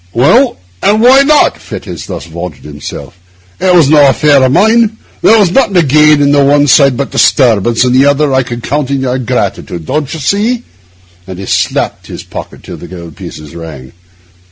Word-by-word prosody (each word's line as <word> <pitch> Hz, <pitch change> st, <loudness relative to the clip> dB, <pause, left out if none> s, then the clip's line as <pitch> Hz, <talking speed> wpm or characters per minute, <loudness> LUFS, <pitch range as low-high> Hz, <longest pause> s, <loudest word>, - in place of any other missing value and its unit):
'Well, 235 Hz, -, +2 dB, 0.2 s
and 210 Hz, +1 st, +2 dB
why 255 Hz, +4 st, +5 dB
not?' 295 Hz, +1 st, +2 dB
Fettes -, -, -8 dB
thus -, -, -7 dB
vaunted 85 Hz, -2 st, -8 dB
himself. 75 Hz, +4 st, -10 dB, 0.4 s
'It 185 Hz, 0 st, +1 dB
was 170 Hz, -5 st, +4 dB
no 145 Hz, -1 st, +5 dB
affair 145 Hz, 0 st, +2 dB
of 130 Hz, -, +2 dB
mine. 220 Hz, -, +2 dB, 0.2 s
There 225 Hz, -, +4 dB
was 200 Hz, -5 st, +2 dB
nothing 215 Hz, -3 st, +1 dB
to 175 Hz, -, +4 dB
gain 150 Hz, +1 st, +3 dB
on 140 Hz, -, +2 dB
the 145 Hz, -1 st, +3 dB
one 145 Hz, +1 st, +3 dB
side 140 Hz, -2 st, +3 dB
but 140 Hz, -, -4 dB
disturbance, 120 Hz, -3 st, +2 dB
and 125 Hz, -1 st, 0 dB
on 130 Hz, -, +4 dB
the 140 Hz, -, +3 dB
other 145 Hz, 0 st, 0 dB
I 130 Hz, -, +2 dB
could 120 Hz, -1 st, -7 dB
count 145 Hz, -1 st, -2 dB
on 140 Hz, -1 st, -1 dB
your 130 Hz, 0 st, -2 dB
gratitude, 90 Hz, -7 st, -4 dB
don't 145 Hz, -, -3 dB
you 160 Hz, -, -6 dB
see?' 215 Hz, -, -1 dB, 0.6 s
And 95 Hz, -1 st, -8 dB
he 95 Hz, -, -7 dB
slapped -, -, -2 dB
his -, -, -9 dB
pocket -, -, -10 dB
till -, -, -9 dB
the -, -, -11 dB
gold 85 Hz, -3 st, -11 dB
pieces 75 Hz, +1 st, -11 dB
rang. 80 Hz, -6 st, -10 dB
140 Hz, 200 wpm, -10 LUFS, 115-180 Hz, 0.6 s, why